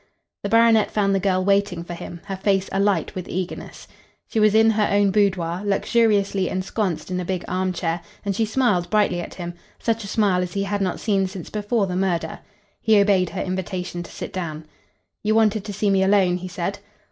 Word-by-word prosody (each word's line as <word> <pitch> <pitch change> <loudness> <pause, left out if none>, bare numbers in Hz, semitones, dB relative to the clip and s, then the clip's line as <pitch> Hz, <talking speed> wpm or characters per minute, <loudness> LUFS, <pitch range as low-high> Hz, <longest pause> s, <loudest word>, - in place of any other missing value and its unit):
The 200 - -3
baronet 230 -1 +5
found 200 -2 +1
the 195 - +2
girl 185 -1 +1
waiting 200 -3 +1
for 175 - -7
him, 170 0 -8
her 195 -1 -4
face 195 0 +1
alight 195 -4 +1
with 185 -1 -6
eagerness. 185 0 -5 0.4
She 225 - -1
was 215 0 +4
in 225 0 +6
her 210 -1 +2
own 200 -1 +3
boudoir, 190 -4 +1
luxuriously 200 -2 +2
ensconced 185 -1 -2
in 180 - -1
a - - -2
big 180 0 -3
arm 185 +1 0
chair, 170 -1 -2 0.2
and 200 -1 -1
she 225 - +1
smiled 210 -7 +1
brightly 205 -4 +2
at - - -8
him 175 -1 -5 0.2
such 230 -1 -1
a - - -7
smile 200 -3 +2
as 180 -1 -4
he 200 -1 -1
had 200 0 -2
not 185 -2 -1
seen 195 -3 +1
since 185 -3 -8
before 210 0 0
the 180 -2 -3
murder. 185 -2 -1 0.4
He 220 -2 +5
obeyed 195 -3 +3
her 190 - -3
invitation 180 -1 -4
to 175 - -9
sit - - -7
down. 160 -4 -4 0.6
"You 215 +1 +1
wanted 215 -2 +3
to 210 - -5
see 200 0 0
me 195 -1 +3
alone," 190 -2 +3
he 185 +1 -6
said. 180 +3 -4
195 Hz, 205 wpm, -23 LUFS, 180-205 Hz, 0.6 s, in